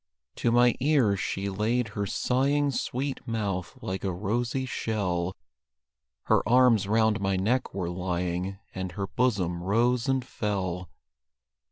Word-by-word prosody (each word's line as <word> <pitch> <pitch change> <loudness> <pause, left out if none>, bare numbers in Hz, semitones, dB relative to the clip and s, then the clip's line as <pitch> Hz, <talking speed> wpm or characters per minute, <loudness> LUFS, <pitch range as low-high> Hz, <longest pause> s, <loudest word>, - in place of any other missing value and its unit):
To 120 - +1
my 120 0 +5
ears 130 -8 +3
she 100 +1 -2
laid 110 +4 0
her 100 -1 -3
sighing 140 +6 +1
Sweet 135 +1 -3
mouth, 100 -6 -2
like 95 +1 -3
a 95 - 0
rosy 120 +8 -1
shell; 95 -7 -2 0.9
Her - - +3
arms 120 -5 +5
round 110 -1 +2
my 95 -1 +1
neck 110 +8 0
were 90 -3 -2
lying, 90 +1 -2 0.2
And 95 -2 -4
her 100 +2 -2
bosom 95 -7 0
rose 120 +6 +2
and 130 -2 +1
fell. 95 -7 -3
105 Hz, 135 wpm, -27 LUFS, 95-125 Hz, 0.9 s, my